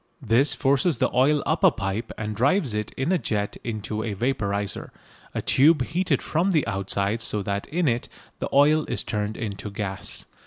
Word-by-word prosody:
This 130 +2 +2
forces 140 +4 +2
the - - 0
oil 140 +3 +3
up 165 +5 0
a 190 - +9
pipe 110 - -3
and 105 -1 -4
drives 135 - +2
it 105 0 -2
in 135 +7 -1
a 185 - +2
jet 105 -6 -2
into 110 -1 -3
a 110 -2 -3
vaporiser, 100 -4 -2 0.5
a - - -2
tube 150 0 +4
heated 175 +8 0
from 180 +5 +1
the 155 - +2
outside 100 +3 -1
so 105 -2 -3
that 100 +1 -3
in 170 +1 0
it 120 -1 0 0.3
the - - -3
oil 150 +3 +5
is - - -2
turned 105 0 -3
into 105 -2 -5
gas. 100 -1 -3
115 Hz, 185 wpm, -25 LUFS, 105-145 Hz, 0.5 s, a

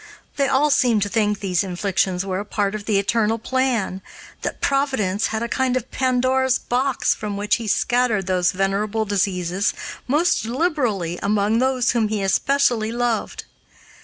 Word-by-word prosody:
They 280 -1 +1
all 290 +3 +2
seemed 240 -7 +3
to 205 - -3
think 210 -1 0
these 185 -3 0
inflictions 185 0 -1
were 190 -1 -2
a - - -3
part 205 -1 -1
of 210 -1 -5
the 210 -2 +1
eternal 220 +2 +1
plan 235 -6 -1 0.4
that - - -4
Providence 265 -8 0
had 220 +1 -3
a - - -2
kind 255 +1 0
of 255 0 -6
Pandora's 260 0 +1
box, 260 +2 0
from 205 -2 -5
which 205 +1 +1
he 230 -2 -6
scattered 235 -2 +1
these 180 -2 +1
venerable 200 +3 -1
diseases 190 -1 0 0.3
most 305 +7 +2
liberally 235 - -1
among 210 +2 +1
those 260 -1 +2
whom 230 -3 +1
he 210 -2 -2
especially 235 +2 +1
loved. 240 -1 -2
220 Hz, 160 wpm, -21 LUFS, 200-255 Hz, 0.4 s, seemed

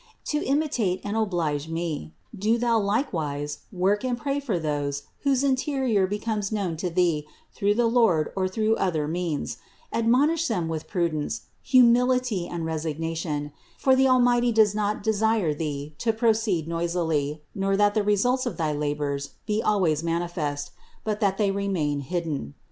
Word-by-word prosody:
To 300 - 0
imitate 265 -10 0
and 205 +1 -3
oblige 165 -8 -1
me, 165 -1 -4 0.2
do 215 +4 +1
thou 235 -1 +2
likewise 155 - -1
work 195 +3 +1
and 250 -2 -1
pray 280 +2 -1
for 245 -10 -1
those 145 -3 -2 0.2
whose 275 -2 +1
interior 260 -7 +1
becomes 210 0 -2
known 195 -6 -1
to 180 +2 -2
thee 165 -4 +1 0.3
through 205 +1 +1
the 240 +1 +2
Lord 225 -10 +3
or 190 -1 +1
through 215 +3 +1
other 160 -6 0
means; 165 -2 -2 0.4
admonish 280 +9 +3
them 180 -8 -1
with 160 -1 -4
prudence, 155 - -1 0.2
humility 250 -5 +4
and 170 -2 -4
resignation; 160 -1 -3 0.3
for 265 -1 +4
the 265 0 +4
Almighty 245 -1 +4
does 220 -2 +4
not 210 0 -1
desire 220 -5 +2
thee 145 -1 -4
to 230 - +2
proceed 220 -7 +1
noisily, 165 -3 -1
nor 195 -1 0
that 205 0 +4
the 215 - +2
results 245 +6 +2
of 245 - -4
thy 160 -3 0
labors 145 -1 -2
be 215 0 0
always 180 -9 +2
manifest, 165 -4 -2 0.3
but 210 -1 -2
that 195 -3 +1
they 205 -2 +2
remain 185 -8 -1
hidden. 150 - -3
195 Hz, 155 wpm, -25 LUFS, 160-225 Hz, 0.4 s, humility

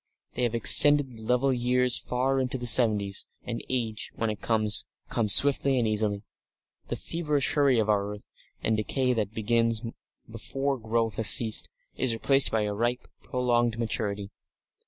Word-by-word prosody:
They - - -5
have 120 -1 -1
extended 145 +4 +6
the 115 -2 -14
level 125 +4 -1
years 125 0 0
far 130 +2 -2
into 130 0 -1
the 125 - -7
seventies, 105 -4 +3 0.2
and 115 -1 -7
age, 115 -4 -4
when 115 -1 -3
it 105 - -10
comes, 110 -2 0 0.3
comes 105 -3 +4
swiftly 140 -1 +2
and 120 -3 -1
easily. 105 -1 -2 0.6
The - - -5
feverish 150 -5 -3
hurry 140 -4 +1
of 110 -2 -1
our 105 -1 -2
earth, 105 - -19 0.3
the - - -2
decay 125 +4 -2
that 110 -2 -5
begins 115 +1 -1 0.4
before 135 +4 -5
growth 115 0 -3
has 110 - +5
ceased, 110 -2 +5 0.3
is 130 -3 +2
replaced 135 +4 +1
by 110 - -2
a 105 0 -4
ripe 120 +4 -4
prolonged 120 -2 -2
maturity. 105 -3 -4
115 Hz, 160 wpm, -25 LUFS, 110-125 Hz, 0.6 s, extended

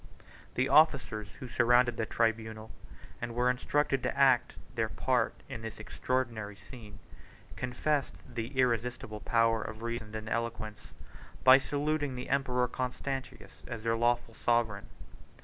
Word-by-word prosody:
The 130 +1 +2
officers, 135 -9 +4
who 130 - -6
surrounded 120 0 +4
the 110 -1 -2
tribunal, 110 -1 -1 0.5
and 115 - -4
were 125 +1 +3
instructed 135 +1 0
to - - -2
act 135 -3 +4 0.2
their 110 -2 0
part 125 -2 0
in 115 - -6
this 110 -1 -6
extraordinary 110 -2 -2
scene, 105 -1 -12 0.6
confessed 135 +3 -1
the 120 -2 -4
irresistible 120 -3 0
power 115 0 +2
of 110 +1 -7
reason 115 -2 -4
and 110 0 -5
eloquence, 110 -2 -3 0.6
by 130 +1 +9
saluting 145 0 -1
the 125 0 -6
emperor 125 -2 +1
Constantius 130 +1 -5
as 115 -3 -6
their 115 0 +1
lawful 120 0 +1
sovereign. 110 -3 0
120 Hz, 130 wpm, -31 LUFS, 110-130 Hz, 0.6 s, by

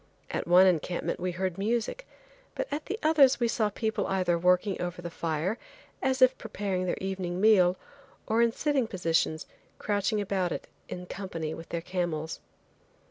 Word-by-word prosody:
At - - -3
one 180 +2 +7
encampment 175 -1 0
we 180 +1 -1
heard 185 +1 -3
music, 235 - -1 0.5
but - - -2
at 300 +1 -3
the 415 - -2
others 285 -5 +5
we 240 - +2
saw 220 -1 +1
the 205 - -7
people 220 -1 -1
either 185 -2 +1
working 180 +3 +2
over 175 0 -4
the 170 -1 -6
fire, 165 +6 -2 0.4
as 260 0 +3
if 255 0 +6
preparing 200 -4 -2
their - - -1
evening 185 -2 -3
meal, 190 -4 +5 0.5
or 225 +2 +2
in 235 0 +4
sitting 275 -1 0
positions 165 -4 0 0.3
crouching 205 0 0
about 190 -3 -1
it - - -4 0.2
in 180 0 -6
company 165 -5 -5
with 165 - -9
their 170 - -3
camels. 170 -3 -3
190 Hz, 170 wpm, -28 LUFS, 175-220 Hz, 0.5 s, one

